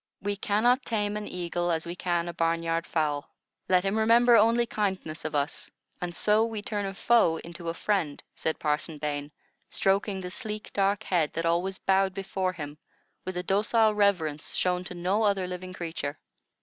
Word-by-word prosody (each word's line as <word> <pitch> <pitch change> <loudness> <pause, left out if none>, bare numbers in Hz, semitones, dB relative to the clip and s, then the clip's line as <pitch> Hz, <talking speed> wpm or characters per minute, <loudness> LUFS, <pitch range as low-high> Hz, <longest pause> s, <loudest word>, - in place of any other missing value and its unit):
"We 205 +1 -2
can 205 +2 0
not 250 +2 +4
tame 210 -2 -1
an 210 0 -4
eagle 175 0 -2
as 165 -1 0
we 170 +1 -5
can 175 -1 -1
a 170 - -4
barnyard 165 0 0
fowl. 150 -3 -1 0.4
Let 180 -1 +4
him 200 +3 +1
remember 235 +2 +6
only 230 +2 +5
kindness 190 -8 -3
of 155 - -3
us, 145 +1 -1 0.3
and 175 -1 -4
so 210 +4 +3
we 225 -2 -3
turn 205 -2 -2
a 195 - -4
foe 225 -8 +4
into 170 +1 -7
a 165 - -3
friend," 175 -7 -1
said 160 - -2
Parson 150 +1 -1
Bain, 145 0 -3 0.4
stroking 195 0 +1
the 180 -1 -6
sleek, 215 -1 -5
dark 200 +1 +1
head, 170 -7 +1
that 165 +1 -2
always 175 +3 +1
bowed 190 0 +2
before 190 -1 -2
him, 150 -3 -7 0.5
with 185 -1 -4
a 180 - -2
docile 215 +3 +3
reverence 175 -8 +1
shown 180 0 +1
to 180 - -6
no 185 +5 +1
other 200 -3 +2
living 180 0 -6
creature. 165 -5 -4
185 Hz, 185 wpm, -28 LUFS, 165-205 Hz, 0.5 s, remember